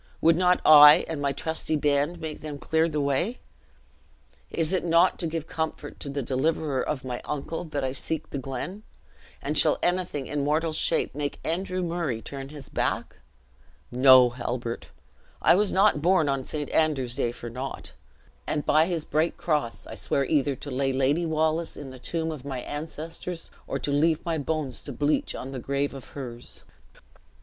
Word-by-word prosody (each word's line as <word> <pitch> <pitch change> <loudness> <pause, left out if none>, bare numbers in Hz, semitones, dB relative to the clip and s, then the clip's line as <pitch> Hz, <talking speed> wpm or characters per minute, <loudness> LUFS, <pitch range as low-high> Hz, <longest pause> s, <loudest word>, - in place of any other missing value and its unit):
would 165 0 +5
not 180 +1 +3
I 150 -1 +9
and 155 -3 -4
my 140 -1 +1
trusty 160 +2 -2
band 145 +3 +1
make 160 -2 -6
them 150 -2 -6
clear 160 +3 +1
the 150 -1 -2
way? 140 - 0 1.1
Is 165 +2 -1
it 185 - +1
not 170 +2 +3
to 170 - -1
give 160 -1 -3
comfort 160 -1 -4
to 140 - -6
the 140 0 -3
deliverer 140 +1 0
of 135 -2 -3
my 125 -1 -4
uncle, 150 +4 -4
that 145 -3 -3
I 130 - 0
seek 145 +4 -4
the 140 - -3
glen? 135 - -5 0.6
and - - -2
shall - - +5
anything 175 -6 0
in 145 0 -2
mortal 155 +2 +1
shape - - +1
make 145 0 -4
Andrew 185 +2 -2
Murray 165 -9 -2
turn 135 +3 -8
his 145 -2 -9
back? - - -2 0.7
No, 130 0 +7
Halbert! 120 -1 -4 0.5
I - - +5
was 200 +3 +2
not 195 -5 +4
born 175 -2 +3
on 135 -2 -1
St. 150 -2 -4
Andrew's 140 -6 +1
day 120 -3 -1
for 120 -1 -8
naught; 130 +3 -6 0.6
and 150 -1 -1
by 155 +2 +4
his 170 -4 -2
bright 155 +3 0
cross 150 -8 -1
I - - -9
swear 140 - 0
either 145 -1 +1
to 140 +3 -8
lay 135 +1 0
Lady 140 +6 +1
Wallace 160 +1 0
in 140 -2 -8
the 130 - -11
tomb 160 +4 -2
of 150 -5 -7
my 135 -3 -4
ancestors, 160 +4 -6 0.2
or - - -2
leave 150 +3 +1
my 165 -2 -1
bones 145 -4 -3
to 145 - -7
bleach 145 +5 0
on 130 - -6
the 135 - -5
grave 140 +3 -1
of 135 -2 -9
hers." 120 -3 -8
150 Hz, 180 wpm, -26 LUFS, 135-160 Hz, 1.1 s, I